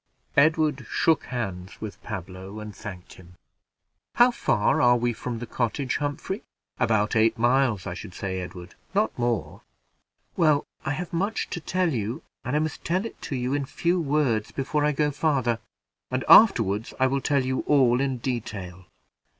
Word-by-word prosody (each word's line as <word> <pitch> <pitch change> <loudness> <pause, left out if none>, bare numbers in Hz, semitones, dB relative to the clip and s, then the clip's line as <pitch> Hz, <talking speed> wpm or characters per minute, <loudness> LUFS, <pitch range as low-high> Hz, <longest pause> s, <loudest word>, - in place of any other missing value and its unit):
Edward 150 -4 +3
shook 160 -2 +2
hands 95 -7 -5
with 110 -2 -7
Pablo, 95 0 -7
and 105 -1 -8
thanked 95 -5 -9
him. 90 -1 -16 0.8
"How 245 +1 +6
far 115 - +1
are 120 0 +5
we 120 0 0
from 120 +1 -5
the 120 - -5
cottage, 125 +3 -1
Humphrey?" 145 +8 -3 0.4
"About 105 -1 +2
eight 110 +1 +3
miles, 120 -4 +2
I 90 - -3
should 90 0 -9
say, 95 -1 -3
Edward; 90 0 -8 0.2
not 210 +2 +2
more." 120 -3 -2 0.7
"Well, 155 -4 +3 0.2
I 135 - -1
have 175 +4 -5
much 200 +6 -1
to - - -3
tell 175 0 0
you, 115 +1 -3 0.2
and 125 - -2
I - - +4
must 155 0 -2
tell 185 +5 0
it 230 - -8
to 140 - -4
you 125 +1 -1
in 145 -1 0
few 175 +5 0
words 140 -8 +1
before 145 +2 -1
I 150 - +3
go 150 0 +1
farther, 135 -6 +1 0.5
and 130 0 -2
afterward 115 - +6
I 130 - +4
will 135 +1 +1
tell 140 -2 +1
you 130 0 -1
all 130 -3 +4
in 135 -2 0
detail." 105 -7 -5
125 Hz, 170 wpm, -26 LUFS, 105-150 Hz, 0.8 s, How